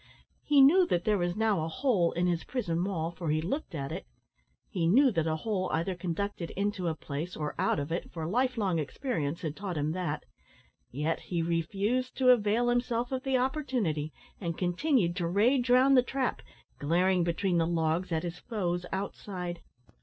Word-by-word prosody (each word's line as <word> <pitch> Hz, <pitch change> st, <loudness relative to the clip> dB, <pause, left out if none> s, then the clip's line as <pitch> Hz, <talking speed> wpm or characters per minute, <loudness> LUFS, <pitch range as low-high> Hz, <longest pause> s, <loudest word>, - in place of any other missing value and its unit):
He 290 Hz, -2 st, +4 dB
knew 345 Hz, +7 st, +7 dB
that 175 Hz, 0 st, 0 dB
there 210 Hz, -2 st, +2 dB
was 175 Hz, 0 st, -1 dB
now 215 Hz, -6 st, +1 dB
a -, -, -2 dB
hole 210 Hz, -, +1 dB
in 175 Hz, +1 st, 0 dB
his 175 Hz, -2 st, 0 dB
prison 175 Hz, -10 st, -2 dB
wall, 170 Hz, -4 st, -2 dB
for 170 Hz, -2 st, -5 dB
he 155 Hz, +1 st, +2 dB
looked 195 Hz, -, -3 dB
at 140 Hz, -1 st, -4 dB
it; 175 Hz, -, -6 dB, 0.6 s
he 170 Hz, -5 st, -1 dB
knew 260 Hz, +9 st, +5 dB
that 165 Hz, -5 st, 0 dB
a 160 Hz, -, +1 dB
hole 185 Hz, +1 st, -2 dB
either 170 Hz, +4 st, 0 dB
conducted 180 Hz, 0 st, -3 dB
into 200 Hz, -2 st, -1 dB
a 160 Hz, -, 0 dB
place 155 Hz, +4 st, -5 dB
or 150 Hz, -1 st, -3 dB
out -, -, +2 dB
of 145 Hz, +2 st, -3 dB
it, 170 Hz, -, -3 dB
for 160 Hz, -2 st, -5 dB
life 250 Hz, +8 st, 0 dB
long 190 Hz, -6 st, +1 dB
experience 155 Hz, -, -3 dB
had 155 Hz, -2 st, -3 dB
taught 195 Hz, -5 st, -4 dB
him 150 Hz, +1 st, 0 dB
that; 160 Hz, -4 st, -3 dB, 0.7 s
yet 150 Hz, +5 st, -1 dB
he 170 Hz, -2 st, -2 dB
refused 200 Hz, +10 st, -1 dB
to 255 Hz, -1 st, +4 dB
avail 230 Hz, 0 st, +3 dB
himself 245 Hz, 0 st, 0 dB
of 260 Hz, -1 st, -1 dB
the 265 Hz, 0 st, +1 dB
opportunity, 250 Hz, -, -1 dB, 0.3 s
and 170 Hz, -4 st, -3 dB
continued 180 Hz, -, +1 dB
to 175 Hz, -3 st, 0 dB
rage 240 Hz, +8 st, +2 dB
round 260 Hz, +2 st, +6 dB
the 255 Hz, -, +7 dB
trap, 260 Hz, +1 st, -2 dB, 0.4 s
glaring 175 Hz, +4 st, +2 dB
between 175 Hz, +1 st, +1 dB
the 165 Hz, -, +2 dB
logs 165 Hz, +1 st, 0 dB
at 160 Hz, -1 st, 0 dB
his 175 Hz, 0 st, -5 dB
foes 175 Hz, -6 st, -2 dB
outside. 185 Hz, -2 st, -4 dB
180 Hz, 190 wpm, -30 LUFS, 165-240 Hz, 0.7 s, knew